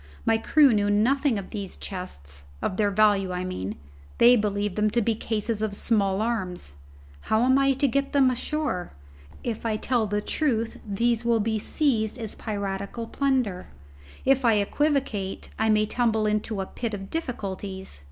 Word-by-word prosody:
My 225 0 +3
crew 280 +2 +5
know 205 -1 +2
nothing 245 +5 +2
of 195 - -6
these 200 -4 -5
chests: 70 - -6
of 185 - -2
their 210 -1 +3
value, 200 -2 +3
I 180 0 -2
mean; 105 - -4 0.4
they 240 +1 +7
believe 205 -2 0
them 210 +1 +2
cases 225 -1 -1
of 215 -2 -1
small 200 -2 +1
arms. 185 - -2 0.6
How 220 +2 +3
am 260 +2 +4
I 275 0 +4
to 270 +2 +1
get 275 +2 0
them 270 -2 +4
ashore? 255 - -2 0.5
If 230 -3 -3
I 220 -2 0
tell 235 -1 0
the 205 +1 0
truth, 230 -1 -1
they 235 +4 +2
will 235 -1 +2
be 220 0 0
seized 225 -4 0
as 225 -3 -5
piratical 200 +1 -4
plunder. 250 -8 0 0.6
If 270 0 +3
I 230 -2 +5
equivocate, 215 -2 0
I 220 0 +2
may 215 0 +4
tumble 220 -1 +1
into 210 -1 -1
a - - -3
pit 225 +2 -4
of 195 -1 -8
difficulties. 195 - -5
215 Hz, 160 wpm, -26 LUFS, 200-240 Hz, 0.6 s, they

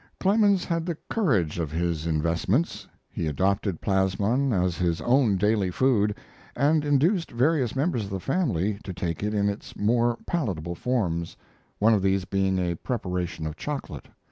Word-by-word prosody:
Clemens 200 -1 +3
had 165 0 -2
the 170 -3 -2
courage 100 - +1
of 80 -3 -2
his 85 -1 -1
investments. 85 - 0 0.2
He 80 - -4
adopted 95 +4 0
plasmon 100 +7 +1
as 90 -4 +1
his 85 -2 0
own 120 -5 +3
daily 105 0 +2
food, 105 -1 +2 0.4
and 145 +3 +2
induced 160 +6 +2
various 130 0 +1
members 135 - 0
of - - -8
the 95 -1 -3
family 105 - 0
to 95 - -6
take 85 -3 -3
it 105 +1 -1
in 100 0 +2
its 100 0 -5
more 120 +2 +2
palatable 95 - -2
forms, 85 -7 -2 0.4
one 110 +2 +4
of 105 - +2
these 95 -1 +1
being 95 0 0
a 90 -1 0
preparation 90 -8 -3
of 80 0 -4
chocolate. 145 -2 -5
100 Hz, 160 wpm, -26 LUFS, 90-135 Hz, 0.4 s, one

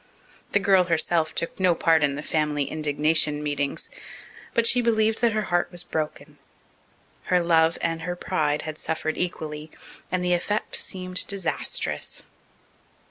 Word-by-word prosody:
The 200 - +4
girl 195 -2 +4
herself 165 -1 +1
took 170 - -3
no 180 -2 +4
part 160 -1 +3
in 140 -1 +2
the 145 - -5
family 150 -2 0
indignation 150 0 +1
meetings. 145 - -2 0.6
But 235 - +3
she 245 +1 +5
believed 220 -1 +2
that 235 -2 +3
her 215 0 0
heart 175 - +3
was 175 -1 -3
broken. 155 -3 -5 0.9
Her 180 - +3
love 165 -1 +3
and 165 -1 -1
her 175 +1 -3
pride 155 -5 -1
had 155 -1 -6
suffered 155 -1 -2
equally, 155 -3 -4 0.4
and 180 -1 0
the 180 - +2
effect 205 +4 -1
seemed 185 0 -1
disastrous. 200 -1 -2
165 Hz, 145 wpm, -25 LUFS, 155-185 Hz, 0.9 s, she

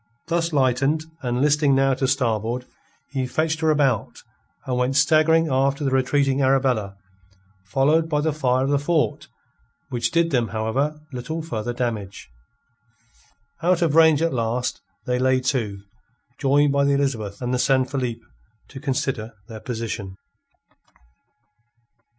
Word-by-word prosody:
Thus 170 0 0
lightened, 140 +2 +1 0.2
and 125 0 -1
listing 145 -1 +3
now 135 0 +3
to 130 +1 -1
starboard, 120 -2 -1 0.5
he 130 -2 -2
fetched 160 +3 -1
her 160 -1 +1
about, 140 -7 0 0.4
and 130 - -2
went 125 +2 0
staggering 160 +3 +4
after 135 +1 +1
the 135 - 0
retreating 135 +1 +1
Arabella, 130 -7 +1 0.7
followed 150 +11 +2
by 150 -2 +1
the 155 0 0
fire 130 -3 +1
of 135 - 0
the 145 - +2
fort, 150 -1 0 0.6
which 120 -1 -1
did 165 +2 +1
them, 120 -3 +1
however, 115 +9 -2
little 160 +6 -4
further 120 -6 -4
damage. 110 - -4 1.3
Out 175 +1 +2
of 160 -4 +1
range, 160 -1 +5
at 165 - 0
last, 120 +1 -2 0.2
they 125 0 0
lay 130 0 +3
to, 115 -7 -2 0.6
joined 145 +1 +3
by 140 0 +2
the 140 0 +2
Elizabeth 120 -8 -1
and 125 0 -2
the 125 - 0
San 130 0 +3
Felipe, 125 -4 -4 0.5
to 135 - -9
consider 130 -5 -3
their 110 -1 -8
position. 110 -5 -5
135 Hz, 140 wpm, -23 LUFS, 120-150 Hz, 1.3 s, range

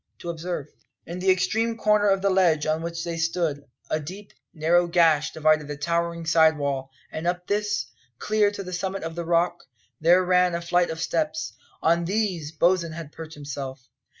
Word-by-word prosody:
to 170 - -5
observe. 170 -2 -4 0.4
In 170 +2 -6
the 190 +1 +1
extreme 225 +5 +1
corner 210 -1 +3
of 195 -1 +2
the 200 - +3
ledge 170 -5 +3
on 155 +1 0
which 170 0 -4
they 170 -1 -4
stood, 160 -3 -1 0.3
a 155 - +1
deep, 190 +7 -9 0.2
narrow 175 +2 +2
gash 165 -3 +3
divided 155 -1 +2
the 145 -1 -5
towering 170 +2 -1
side 160 -1 +4
wall, 140 -2 -2 0.2
and 160 +2 -4
up 175 0 -1
this, 210 +1 0 0.3
clear 210 +4 +2
to 205 -1 -6
the 185 0 -7
summit 190 +1 -3
of 165 0 -4
the 170 0 -5
rock, 175 +1 +1 0.4
there 175 +3 +5
ran 180 -1 +3
a 170 - -2
flight 175 +1 +2
of 160 - -5
steps. 160 -1 -1 0.3
On 170 +1 +3
these 185 -6 -1
Bosin 170 0 +2
had 160 -2 -8
perched 160 0 -9
himself. 135 -3 -7
170 Hz, 185 wpm, -25 LUFS, 160-180 Hz, 0.4 s, there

